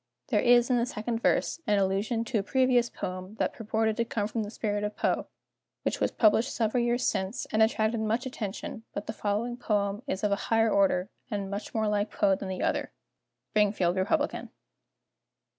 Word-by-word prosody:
There - - +3
is, 240 0 +5
in 250 - +4
the 235 - +2
second 230 +1 -3
verse, - - +1
an 210 -1 +3
allusion 200 +4 0
to 225 -1 0
a - - +1
previous 250 +2 +2
poem 185 +3 -6
that - - -1
purported 220 0 -1
to 235 - +2
come 210 -3 -1
from 225 +1 -2
the 205 - -4
spirit 205 -1 -2
of 210 0 -3
Poe, - - 0 0.6
which - - -1
was - - +2
published 225 +3 +3
several 235 +1 +1
years 240 +1 +1
since, 190 +7 -1
and 215 - +2
attracted 220 0 +2
much 220 +3 0
attention, 225 -2 -5
but 200 - -3
the 220 - -4
following 220 +3 -2
poem 205 -3 0
is 190 - -3
of 210 - +2
a - - +4
higher 225 -1 +3
order, 195 0 +2 0.2
and 200 -2 -3
much 205 +3 -5
more 220 -1 +1
like 210 0 0
Poe 195 - +2
than 190 0 -3
the 185 - -3
other." - - 0 0.6
_Springfield 200 -4 +3
Republican. 285 +11 0
215 Hz, 190 wpm, -28 LUFS, 200-235 Hz, 0.6 s, is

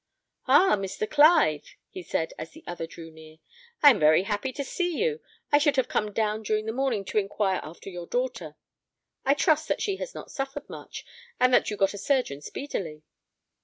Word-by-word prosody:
"Ah! 380 - +6
Mr. 195 +2 -3
Clive," 290 - +4 0.2
he 185 - -7
said, 160 -1 -2
as 155 - -6
the 320 - -16
other 175 -2 -5
drew 165 0 -11
near, 160 0 -15 0.5
"I 290 - +10
am 235 - 0
very 155 +3 +5
happy 205 +5 -2
to 280 - -3
see 350 +4 -2
you; 460 0 0 0.3
I 290 - +6
should 290 -1 +2
have 260 -2 +1
come 210 -3 -1
down 215 0 -1
during 215 0 -1
the 220 - -2
morning 245 -5 -1
to 210 - +1
inquire 195 -1 -1
after 160 +5 -11
your 175 -1 -7
daughter. 245 -12 -3 0.7
I 275 - +4
trust 310 0 +2
that - - 0
she 395 -2 -1
has - - -7
not - - -9
suffered 270 0 -5
much, - - -9 0.3
and 255 0 +4
that - - +4
you 210 - -4
got 195 0 +2
a 200 - -7
surgeon 225 - 0
speedily." 160 - -6
215 Hz, 200 wpm, -26 LUFS, 175-280 Hz, 0.7 s, I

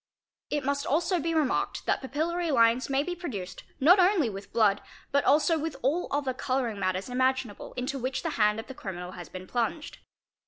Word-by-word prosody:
It 290 -3 -1
must 280 +1 -1
also 340 +5 +1
be 330 +2 -1
remarked 300 -4 0
that - - +1
papillary 325 +6 -1
lines 235 0 +3
may 275 +1 +2
be 360 - -3
produced 210 - -6 0.2
not 350 +8 +6
only 360 - +4
with 195 0 -9
blood, 210 -3 +3 0.3
but 280 0 +3
also 315 +3 +4
with 315 -1 -3
all 300 +7 +1
other 280 -2 -1
colouring 255 -4 -1
matters 185 0 -1
imaginable 255 -3 -1
into 255 +2 -3
which 260 +2 -2
the 330 - -1
hand 210 -4 +2
of 225 - -6
the 265 - -9
criminal 180 -6 -6
has 175 -4 -9
been 185 0 -8
plunged. 240 - -3
265 Hz, 190 wpm, -28 LUFS, 220-305 Hz, 0.3 s, not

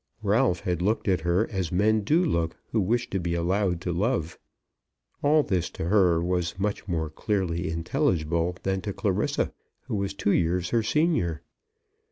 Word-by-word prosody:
Ralph 105 -3 +2
had 90 -2 -1
looked 105 +5 0
at 95 -4 +2
her 85 +6 +1
as 95 -5 -2
men 105 +4 +3
do 160 - +2
look 85 - 0 0.2
who 110 - +2
wish 120 +5 0
to 95 - 0
be 85 -1 -2
allowed 90 +1 0
to 90 -1 -2
love. 90 -3 -1 0.8
All 150 +1 +4
this 90 -7 -1
to 80 - -2
her 90 -5 +4
was 90 -1 -1
much 100 +1 -2
more 80 -4 -1
clearly 90 -2 -1
intelligible 85 - 0
than 95 0 0
to - - -4
Clarissa, - - 0 0.3
who - - -7
was 100 -1 -2
two 100 - 0
years 85 +1 +1
her 115 - +3
senior. 110 - +1
90 Hz, 170 wpm, -26 LUFS, 85-105 Hz, 0.8 s, All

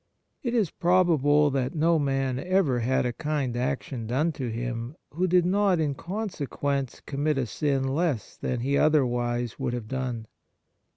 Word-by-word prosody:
It 240 -2 -1
is 210 -9 +2
probable 155 -5 +3
that 130 +2 -1
no 165 +1 +3
man 135 -2 0
ever 175 -6 +2
had 125 +2 +1
a 120 - -1
kind 145 -4 -2
action 125 -1 -2
done 145 +8 +1
to 130 -5 -4
him 120 +3 -4 0.2
who 180 +5 0
did 180 -1 +4
not 195 -1 +3
in 150 -3 +1
consequence 145 - -3
commit 150 +1 0
a 135 - +1
sin 135 +3 0
less 140 - -1
than 125 -2 -3
he 140 +3 +1
otherwise 120 -5 +1
would 120 - -1
have 120 -3 -4
done. 125 -3 -3
140 Hz, 160 wpm, -27 LUFS, 125-160 Hz, 0.2 s, did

